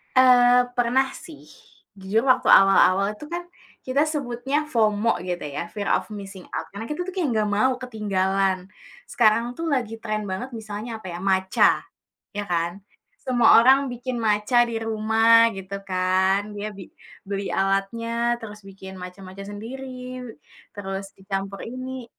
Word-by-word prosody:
Eee, 250 -1 +6
pernah 250 +2 +2
sih. 320 -4 -12 0.5
Jujur 200 +4 0
waktu 255 - +3
awal-awal 195 +1 +5
itu 300 - -10
kan, 350 +1 -3 0.4
kita 270 +3 +1
sebutnya 275 -1 -2
FOMO 220 -2 +2
gitu 180 -1 -4
ya, 145 +3 -5
fear 205 +1 -3
of - - -8
missing 195 -3 -9
out, - - -3
karena 205 +3 -7
kita 300 +6 -4
tuh 375 - -5
kayak 335 -8 0
gak 210 -1 +1
mau 235 +6 +2
ketinggalan. 195 -5 -1 0.4
Sekarang 235 +1 +2
tuh 335 - -3
lagi 235 -5 -1
tren 215 -1 -3
banget 195 +8 -4
misalnya, 220 +1 -6
apa 190 - -9
ya, - - -6
Matcha, 190 -1 +3 0.5
ya 205 - -3
kan? 175 +2 -2 0.4
Semua 245 -4 +5
orang 270 +2 +5
bikin 245 0 -4
Matcha 215 +3 +3
di 230 - -3
rumah 225 +1 +4
gitu 195 +1 -6
kan, 190 +2 +1
dia 205 +1 -4
bi 190 -3 -11 0.4
beli 200 0 -3
alatnya, 230 +5 0
terus 210 -1 -9
bikin 190 -1 -11
Matcha-matcha 190 +2 -9
sendiri, 255 +4 -7 0.6
terus 195 0 -5
dicampur 195 0 -5
ini 255 +1 -6
215 Hz, 145 wpm, -24 LUFS, 195-245 Hz, 0.6 s, Eee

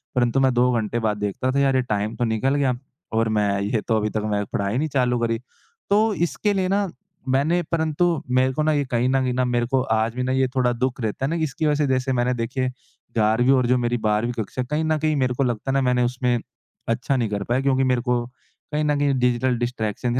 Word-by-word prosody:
परंतु 120 +1 +2
मैं 130 -1 +3
2 125 +1 +3
घंटे 110 +2 -2
बाद 105 -2 0
देखता 105 +5 -2
था 140 - +1
"यार 135 -1 +3
ये 130 - +3
टाइम 105 -2 -2
तो 120 - -2
निकल 115 +5 0
गया 135 -3 +2 0.4
और 115 0 +2
मैं 100 -1 +1
ये 105 +2 0
तो 110 -2 +2
अभी 105 0 0
तक 110 - -2
मैंने 105 -1 -1
पढ़ाई 100 +3 -1
नहीं 155 +4 0
चालू 125 -3 +1
करी।" 115 -1 0 0.5
तो 215 +2 +3
इसके 195 +4 0
लिए 190 -2 0
ना 200 0 +1 0.4
मैंने 150 +7 +2
परंतु 160 0 +1
मेरे 130 +1 +3
को 155 - 0
ना 155 - +2
ये 145 -1 +1
कहीं 125 +1 +2
न 135 0 +2
कहीं 125 -1 0
ना 125 0 +1
मेरे 120 -1 +1
को 130 +1 +1 0.2
आज 110 +1 0
भी 125 - -1
ना 130 - -1
ये 130 0 +2
थोड़ा 125 -2 +2
दुःख 130 +2 -2
रहता 110 +4 -2
है - - -1
ना, 165 - -1
इसकी 155 +1 -2
वज़ह 150 -1 +3
से - - -1
जैसे 130 +1 0
मैंने 125 0 +1
देखिए 125 +2 -2 0.5
11वीं 115 +4 +3
और 130 -2 +2
जो 125 +1 +3
मेरी 120 0 0
12वीं 110 +2 0
कक्षा, 125 +5 -4
कहीं 150 +5 -2
न 155 0 +1
कहीं 155 0 0
मेरे 130 -3 +1
को 135 - 0
लगता 120 +1 -1
है - - -1
ना, 135 - +2
मैंने 125 -1 +2
उसमें 125 0 0 0.5
अच्छा 125 +4 0
नहीं 115 -4 0
कर 100 -1 -2
पाया 120 +5 0
क्योंकि 135 -1 +2
मेरे 125 -2 +1
को 120 -1 0 0.5
कहीं 150 +1 0
न 150 -1 +1
कहीं 145 -1 +2
डिजिटल 125 0 +1
डिस्ट्रैक्शन 120 0 -2
थी 130 - +2
125 Hz, 250 wpm, -23 LUFS, 115-135 Hz, 0.5 s, मैं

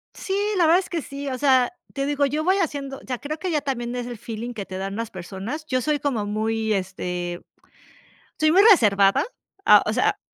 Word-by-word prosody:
Sí, 385 - -4 0.2
la 350 - +4
verdad 330 +3 +5
es 380 - -6
que 335 -2 -2
sí, 280 0 -7
o 260 -2 -2
sea, 260 -1 +3 0.2
te 275 -1 -2
digo, 285 0 +1
yo 300 +3 -1
voy 375 +2 +4
haciendo, 280 -6 -2
o - - -18
sea, 255 -1 -3
creo 300 +5 -5
que 365 +3 -3
ya 305 - +2
también 250 -4 -3
es 245 -1 -4
el 240 -1 -6
feeling 230 +3 -6
que 205 -4 -6
te 185 - -7
dan 195 +1 -4
las 230 0 -4
personas. 195 - -6
Yo 255 -3 0
soy 300 +2 0
como 250 -8 -1
muy, 220 +1 -1
este, 180 -2 -3 1.0
soy 310 0 +3
muy 380 +4 +6
reservada, 200 - +5 0.4
a - - +7
o - - -1
sea, - - +1
255 Hz, 220 wpm, -23 LUFS, 210-295 Hz, 1.0 s, a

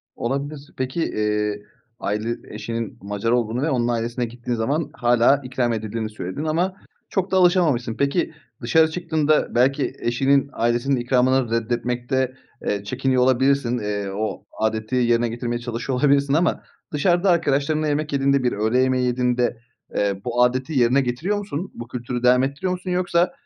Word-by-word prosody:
Olabilir. 140 +3 -4
Peki, 130 +6 -2
eee, 105 -1 -1 0.4
aile 110 +3 -2 0.2
eşinin 115 0 -4
Macar 100 +3 -2
olduğunu 120 0 +1
ve 155 - +1
onun 120 -4 +1
ailesine 120 +1 -1
gittiğin 120 +1 -4
zaman 140 +7 -1
hâlâ 120 +3 +3
ikram 125 -2 -1
edildiğini 110 0 -3
söyledin 105 +5 -5
ama 170 +4 0 0.4
çok 190 -1 -1
da 190 - +3
alışamamışsın. 170 -11 +3
Peki, 140 +4 0 0.3
dışarı 160 +6 +3
çıktığında 155 -5 +1
belki 135 +4 +2
eşinin 135 +3 +2
ailesinin 120 +4 +1
ikramını 125 0 +2
reddetmekte, 120 +2 -1 0.3
eee, 100 -1 -1
çekiniyor 130 +4 +1
olabilirsin. 130 -1 +2
Eee, 105 -2 -3
o 110 +1 -3
âdeti 110 +2 -1
yerine 120 -1 +2
getirmeye 120 +1 -3
çalışıyor 120 +2 -3
olabilirsin 140 -1 +3
ama 165 +2 +1 0.3
dışarıda 175 +6 +2
arkadaşlarınla 155 -2 +2
yemek 150 0 -1
yediğinde, 140 -1 +2
bir 125 - +2
öğle 110 +4 +1
yemeği 130 -1 +2
yediğinde, 125 -1 +1 0.4
eee, 100 -1 0
bu 120 0 +2
âdeti 130 +5 0
yerine 125 +3 +4
getiriyor 135 +11 -1
musun? 195 -4 -5
Bu 120 - -8
kültürü 125 0 -4
devam 125 +1 +5
ettiriyor 140 +7 -2
musun? 180 0 -4
Yoksa 175 -1 +2
125 Hz, 150 wpm, -22 LUFS, 120-145 Hz, 0.4 s, devam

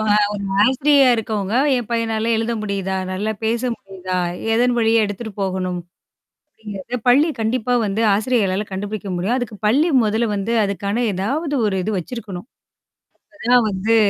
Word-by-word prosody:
ஒரு 210 0 +4 0.4
ஆசிரியரா 270 +2 +4
இருக்கவங்க, 215 -2 -2 0.2
என் 240 - -3
பையனால 225 -1 0
எழுத 225 +1 -1
முடியுதா? 195 -2 -2 0.2
நல்லா 210 +3 -2
பேச 230 +2 0
முடியுதா? 185 -3 -6 0.4
எதன் 245 +1 +3
வழியா 225 0 +3
எடுத்துட்டு 205 +2 -5
போகணும்? 185 -2 -2 0.7
அப்டிங்கிறத 215 +3 -6
பள்ளி 285 +7 +5
கண்டிப்பா 245 +2 0
வந்து 205 +2 -1
ஆசிரியர்களால 210 -3 0
கண்டுபிடிக்க 205 +1 -5
முடியும். 190 +8 0
அதுக்கு 230 -4 -5
பள்ளி 280 +10 +3 0.2
முதல்ல 220 +2 +1
வந்து 200 +3 -2
அதுக்கான 200 +4 -1
ஏதாவது 280 - -2
ஒரு 190 -2 0
இது 215 - -1
வச்சிருக்கணும். 200 -1 -7 0.9
அப்பதான் 245 -5 +3
வந்து 205 +4 +1
220 Hz, 135 wpm, -20 LUFS, 195-235 Hz, 0.9 s, பள்ளி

